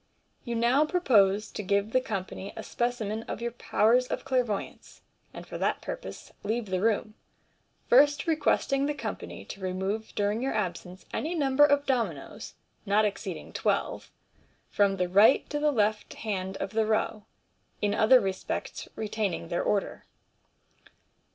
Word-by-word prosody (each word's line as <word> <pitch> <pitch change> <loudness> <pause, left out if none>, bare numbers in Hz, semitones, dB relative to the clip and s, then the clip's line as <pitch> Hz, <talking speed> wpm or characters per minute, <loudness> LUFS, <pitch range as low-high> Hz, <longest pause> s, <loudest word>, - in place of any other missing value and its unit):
You 235 -2 -3
now 240 +5 +3
propose 220 - +3
to - - -4
give 200 +2 0
the 255 - +3
company 195 -3 -5
a 220 - -5
specimen 225 -2 -2
of - - -4
your 235 0 -3
powers 235 +1 +2
of - - -4
clairvoyance, 250 -6 -2 0.3
and - - -9
for - - -7
that - - 0
purpose - - -7
leave 225 +3 -2
the 185 -1 0
room, 215 0 +1 0.7
first 290 +3 +5
requesting 290 -3 +1
the 295 - -1
company - - -6
to 195 - -9
remove 190 +4 -3
during 205 +2 0
your 265 -2 -1
absence 180 -2 -4
any 330 +4 -2
number 280 -2 +3
of 285 0 +4
dominoes 215 - -3 0.3
(not 210 +1 +3
exceeding 205 - -4
twelve) - - -1 0.6
from 200 -1 +2
the 180 -1 0
right 200 +8 +5
to 295 - -1
the 300 0 +3
left 215 -5 0
hand 195 -3 -3
of 195 - -4
the 220 0 +1
row, 215 -1 0 0.5
in 205 0 +1
other 220 +4 +6
respects 190 -3 -4
retaining 210 -6 -2
their 175 - 0
order. 205 -2 -1
220 Hz, 150 wpm, -28 LUFS, 200-255 Hz, 0.7 s, other